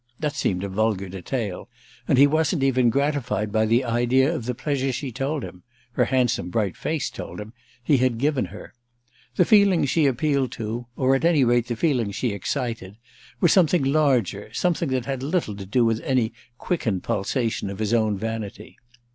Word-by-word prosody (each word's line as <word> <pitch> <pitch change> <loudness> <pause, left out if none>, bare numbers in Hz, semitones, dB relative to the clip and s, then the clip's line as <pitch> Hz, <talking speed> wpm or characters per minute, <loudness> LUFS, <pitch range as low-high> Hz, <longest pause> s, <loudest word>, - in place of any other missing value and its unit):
That 150 -2 -1
seemed 95 -10 -1
a - - -2
vulgar 100 -1 -1
detail, 95 +1 -4 0.4
and - - +3
he 140 - +8
wasn't 155 +1 +1
even 130 -3 +3
gratified 120 -6 -1
by 110 0 +2
the 115 +4 +3
idea 120 +5 +2
of 130 -9 -4
the 125 - -2
pleasure 135 0 -1
she 130 +1 -4
told 135 +3 -2
him—her 120 +6 -5
handsome 125 -8 0
bright 100 -2 -1
face 155 -3 -2
told - - -8
him—he 120 +5 -3
had 125 -2 +1
given 140 +1 +1
her. - - -11 0.6
The 180 - +4
feeling 200 -6 +4
she 150 +2 +2
appealed 135 -1 0
to, 115 0 -5
or 130 0 +2
at 135 - +1
any 165 -5 +4
rate 120 -1 +2
the 120 - -2
feeling 120 -4 +1
she 115 +5 -2
excited, 110 -1 -4 0.4
was 175 - +4
something 175 -4 +3
larger, 135 - +1
something 170 -3 0
that 130 -2 -1
had 135 -2 -3
little 140 - -1
to 100 -1 -8
do 120 +4 +2
with 115 -1 +1
any 125 -4 0 0.2
quickened 115 - -2
pulsation 115 -1 -1
of 100 - -6
his 110 +1 -1
own 110 -3 +2
vanity. 110 0 -6
125 Hz, 180 wpm, -24 LUFS, 110-140 Hz, 0.6 s, he